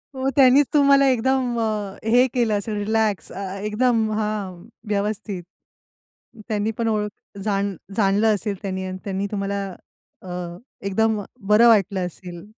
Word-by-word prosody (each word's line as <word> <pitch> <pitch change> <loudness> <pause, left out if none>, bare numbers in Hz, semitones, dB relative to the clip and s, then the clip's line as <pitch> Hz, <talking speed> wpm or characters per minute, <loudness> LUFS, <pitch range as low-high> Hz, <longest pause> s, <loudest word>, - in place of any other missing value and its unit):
हो, 265 +1 0
त्यांनीच 270 +1 +6
तुम्हाला 280 -1 +5
एकदम 255 0 +1
अ, 210 -3 -2
हे 245 +3 +5
केलं 235 -4 +1
असेल 210 +1 -4
रिलॅक्स 215 -1 0
अ, 195 +1 -5 0.2
एकदम 220 +1 +1
हां, 205 -5 -3 0.2
व्यवस्थित. 205 -2 -2 1.0
त्यांनी 215 -1 -1
पण 230 -1 0
ओळख 210 -2 -3
जाण 200 -2 -1 0.2
जाणलं 210 +1 +3
असेल 205 0 -3
त्यांनी 190 -2 -3
अन् 185 - -5
त्यांनी 195 0 -2
तुम्हाला 200 0 -2 0.7
अ, 175 -1 -5 0.3
एकदम 220 +2 +1 0.3
बरं 215 +3 +6
वाटलं 200 -4 +3
असेल. 175 0 -8
210 Hz, 135 wpm, -22 LUFS, 195-225 Hz, 1.0 s, त्यांनीच